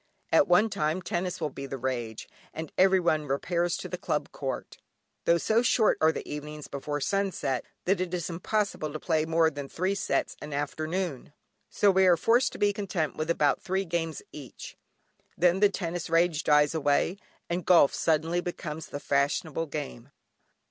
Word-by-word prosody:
At 300 - +5
one 210 +5 +4
time 155 +2 0
tennis 180 +1 -2
will 155 -4 -2
be 135 +1 -7
the 135 - -5
rage, 120 -4 -4 0.3
and 160 -1 -5
every 190 0 +5
one 155 -4 +1
repairs 170 +5 0
to - - -6
the - - -5
Club - - -2
court, - - -5 0.5
tho' 170 - +4
so 220 +7 +2
short 230 -2 +3
are 160 0 +5
the - - -6
evenings 150 0 -6
before 145 +1 -4
sunset, 150 - -1 0.2
that 190 0 +2
it 180 -1 -2
is 175 -2 -2
impossible 180 -2 -2
to 155 - -5
play 160 -2 +1
more 160 0 +3
than 145 -2 -7
three 185 +3 -1
sets 200 - -1
an 150 -1 -7
afternoon, 155 +1 -3 0.4
so 205 - +3
we 190 0 +4
are 175 -2 +6
forced 235 +9 +3
to - - -7
be 205 0 +2
content 185 -6 -2
with 155 +1 -3
about 150 -4 +2
three 190 +1 -1
games 165 -2 -3
each. 140 -5 -10 0.6
Then 180 +2 +3
the 205 0 +5
tennis 175 -4 -4
rage 165 -1 +2
dies 150 0 +4
away, 155 +4 +1 0.3
and 175 +1 -2
golf 170 -6 +5
suddenly 165 +2 +1
becomes 160 -3 -5
the 145 - -6
fashionable 145 +3 0
game. 140 -4 -6
165 Hz, 175 wpm, -28 LUFS, 150-185 Hz, 0.6 s, are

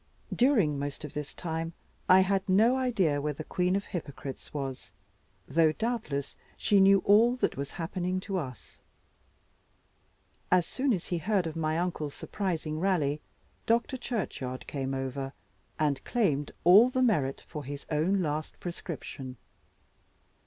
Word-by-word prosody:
During 210 - +3
most 145 +2 -4
of 150 - -9
this 150 -1 -5
time, 165 -1 -3 0.4
I 185 +1 +8
had 195 0 0
no 220 +7 +5
idea 200 - +1
where 150 +1 -1
the 155 - -6
queen 180 +3 0
of 200 - -1
hypocrites 140 -5 -7
was; 135 -3 -5 0.6
though 155 +2 +3
doubtless 220 - -2 0.2
she 205 - +3
knew 195 0 +6
all 225 +5 +6
that 255 - 0
was 140 +1 -5
happening 180 +1 -2
to 195 -1 -2
us. 130 -7 -9 1.7
As 180 -2 +5
soon 270 +7 0
as 185 -7 -2
he 175 - 0
heard 190 +1 +1
of 160 -1 -4
my 155 -1 0
uncle's 165 -4 -2
surprising 165 -6 -3
rally, 155 -6 +1 0.5
Dr. 235 +3 +2
Churchyard 190 - -4
came 135 -1 -3
over, 135 +1 -3 0.4
and 145 -3 0
claimed 150 - 0
all 200 +8 +8
the 255 0 +1
merit 145 - +1
for 150 -3 -6
his 140 +1 -7
own 180 +6 +2
last 155 0 -3
prescription. 145 -7 -6
165 Hz, 145 wpm, -29 LUFS, 145-195 Hz, 1.7 s, I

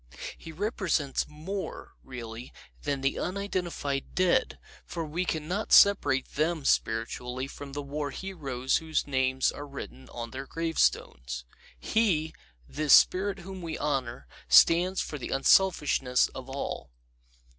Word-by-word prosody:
He 165 - -10
represents 170 - -1
more, 180 +6 -6
really, 120 -2 -8 0.3
than 140 -2 -2
the 135 0 0
unidentified 180 -7 -3
dead, 185 -1 +2 0.3
for 165 -2 -5
we 165 +4 -2
can 155 -3 -2
not 200 +5 -2
separate 145 -10 +5
them 155 0 0
spiritually 125 +3 0
from 140 0 -9
the 145 0 -4
war 145 +1 -3
heroes 140 -7 -2
whose 160 -1 -1
names 130 -1 +1
are 145 - -8
written 65 - -9
on 115 -1 -6
their 135 +2 -6
gravestones. 60 - -1 0.4
HeŌĆöthis 165 - +1 0.6
spirit 190 +6 +5
whom 190 +1 -8
we 165 -2 -4
honor 130 - -2 0.2
ŌĆöstands 175 - +6
for 150 - -6
the - - -5
unselfishness 135 -4 +3
of 130 0 -9
all. 135 +1 -4
145 Hz, 125 wpm, -28 LUFS, 130-175 Hz, 0.6 s, ŌĆöstands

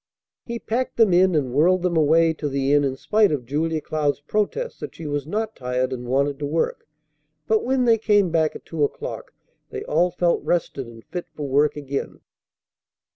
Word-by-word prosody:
He 235 -1 -3
packed 240 +3 -3
them 220 -5 +5
in, 185 0 +4
and 135 -5 0
whirled 175 +6 +3
them 180 -2 0
away 160 +1 +4
to 150 -2 -4
the 135 0 0
inn 145 0 +4
in 135 -1 -1
spite 210 +7 +2
of 140 -5 -2
Julia 155 +4 -1
Cloud's 150 -2 -1
protest 215 - -2
that - - -7
she 165 - -9
was 145 -1 -3
not 215 +5 -2
tired 125 +1 -2
and 125 -1 -6
wanted 140 +2 0
to 145 - -2
work; 160 +3 -2 0.6
but, 220 +6 +2
when 260 0 +1
they 230 -2 +4
came 205 -4 +3
back 160 -2 +1
at - - -10
two 160 -3 -2
o'clock, 145 - -4 0.4
they - - -5
all 170 +4 +2
felt 175 0 +1
rested 140 -7 -1
and 115 -1 -13
fit 180 -1 -6
for 145 -2 -4
work 145 +2 +2
again. 140 -1 -5
155 Hz, 195 wpm, -23 LUFS, 140-185 Hz, 0.6 s, them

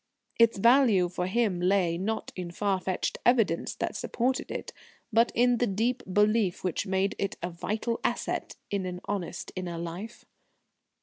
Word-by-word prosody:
Its 230 -2 +5
value 230 -4 +5
for 180 0 -3
him 200 -3 +1
lay, 180 -2 +2
not 210 +5 -3
in 180 -2 -5
far 195 +2 0
fetched 185 0 -2
evidence 225 -9 +2
that - - -3
supported 255 +2 -1
it, - - -5 0.4
but 230 +2 +4
in 245 +1 +4
the 245 - +2
deep 230 +6 0
belief 210 -1 +2
which 185 +2 -1
made 190 +1 +1
it 200 - -2
a 175 - -2
vital 215 +7 -2
asset - - -2 0.2
in 195 -2 -1
an 180 0 -5
honest 185 -3 -4
inner 180 -2 -4
life. 170 +7 -7
200 Hz, 160 wpm, -28 LUFS, 180-230 Hz, 0.4 s, Its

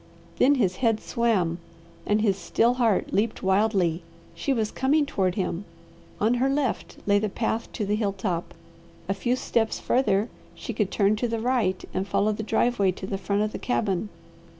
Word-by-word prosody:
Then 285 +3 +5
his 190 -8 +1
head 225 -4 +2
swam, 195 -10 0 0.5
and 210 +1 +2
his 205 -3 +2
still 230 +4 +2
heart 225 -5 +2
leaped 215 +2 0
wildly. 190 -3 +2 0.3
She 280 - -2
was 220 -5 0
coming 290 +3 +2
toward 190 -9 0
him. 185 -2 -2 0.6
On 220 +3 +3
her 265 - +3
left 275 -3 -1
lay 205 0 +4
the 215 0 -1
path 225 +2 -2
to 210 - -2
the 205 - 0
hill 210 -2 0
top. 185 -3 -3 0.5
A 195 - +1
few 240 +5 0
steps 230 -3 0
farther 225 -5 +2 0.3
she 235 - -6
could 210 -3 0
turn 205 0 +2
to 245 - 0
the 230 -1 -2
right 225 -6 0
and 190 +1 -2
follow 210 +1 +2
the 215 - -3
driveway 220 -2 +2
to 190 - -7
the 195 0 -3
front 200 +1 0
of 215 - -1
the - - -6
cabin. 205 -5 -1
215 Hz, 185 wpm, -26 LUFS, 195-235 Hz, 0.6 s, Then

